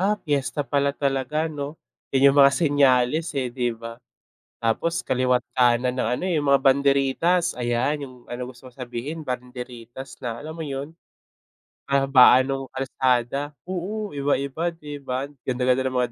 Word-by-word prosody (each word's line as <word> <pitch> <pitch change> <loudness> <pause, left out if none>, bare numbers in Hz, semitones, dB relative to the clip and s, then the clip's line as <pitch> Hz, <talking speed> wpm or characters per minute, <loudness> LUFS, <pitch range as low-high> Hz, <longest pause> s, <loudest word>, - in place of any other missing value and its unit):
"Ah, 205 +3 +2
piyesta 145 -4 -2
pala 140 0 0
talaga 140 +2 0
'no?" 150 -1 -5 0.3
Yun 135 0 +5
yung 145 - +1
mga 140 0 +7
senyales. 145 0 +3
eh. 130 -3 -1
di 125 -1 0
ba. 115 +1 -7 0.6
Tapos 115 +9 -1
kaliwa't 125 -1 +1
kanan 125 0 +3
ng - - 0
ano. - - -6
eh. 185 - 0
yung 145 - 0
mga 140 -1 +5
banderitas 140 +6 +3
ayan. 125 +4 -1
yung 130 -2 -8
ano 125 +1 -6
gusto 130 0 -15
mo 125 - -12
sabihin, 125 +5 -6
banderitas 125 -1 -7
na 120 -2 -5
alam 155 +2 -8
mo 160 - -4
yun. 140 +4 -6 0.9
Kahabaan 135 -2 +5
nung 135 -1 -4
kalsada 130 +1 0 0.2
oo 195 0 -4
iba-iba 140 +4 -1
di 150 -3 -9
ba, 130 +1 -3 0.2
ganda 125 0 -1
ganda 130 +1 +3
ng 130 -1 -1
mga 125 -1 0
135 Hz, 160 wpm, -24 LUFS, 125-145 Hz, 0.9 s, mga